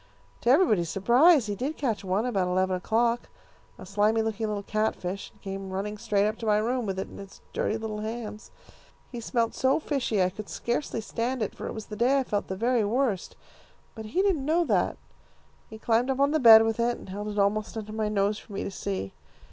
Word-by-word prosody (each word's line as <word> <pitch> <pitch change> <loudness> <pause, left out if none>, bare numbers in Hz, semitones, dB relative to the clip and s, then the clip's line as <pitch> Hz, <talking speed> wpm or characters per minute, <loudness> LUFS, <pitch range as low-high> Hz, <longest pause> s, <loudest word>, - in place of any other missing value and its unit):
To 235 - +1
everybody's 220 - +4
surprise 245 - +5
he 205 - -2
did 270 +10 -3
catch 230 -8 -1
one 190 +4 0
about 195 -7 0
eleven 185 +1 +1
o'clock, 230 +5 0 0.5
a - - -10
slimy 210 +3 +2
looking 220 0 -2
little 205 -1 -3
catfish, 200 -3 -2
and - - -27
came 195 -1 -5
running 205 +2 -4
straight 200 -1 +1
up 215 - -3
to 225 - -4
my 210 -1 +4
room 235 +2 -1
with 190 -1 -2
it 190 - -3
in - - -12
his 195 -1 -11
dirty 220 - 0
little 220 -1 -5
hands. 215 -1 -6 0.6
He 240 - -5
smelled 230 0 -1
so 265 +3 +2
fishy 255 -10 0
I 180 - +1
could 200 +2 -8
scarcely 240 -1 -2
stand 235 +2 -2
it, 205 - -4
for - - -7
it - - -5
was 220 - -6
the 210 - -8
day 250 +5 +3
I 270 - +2
felt 205 -4 -2
the 190 - -4
very 235 +3 +1
worst. 225 -2 -1 0.6
But 220 -1 -8
he 355 - 0
didn't 370 -9 +1
know 330 +4 +2
that. - - +1 0.7
He 220 - -9
climbed 230 +3 +1
up 265 0 0
on 280 +1 +3
the 315 - +2
bed 225 -4 +9
with 225 0 -1
it, 240 +1 +1
and - - -12
held 205 +2 -5
it 210 0 -5
almost 210 +2 0
under 215 -1 -6
my 215 -1 -1
nose 205 0 0
for 210 - -14
me 195 - -3
to - - -4
see. 95 - -4
220 Hz, 225 wpm, -27 LUFS, 200-240 Hz, 0.7 s, bed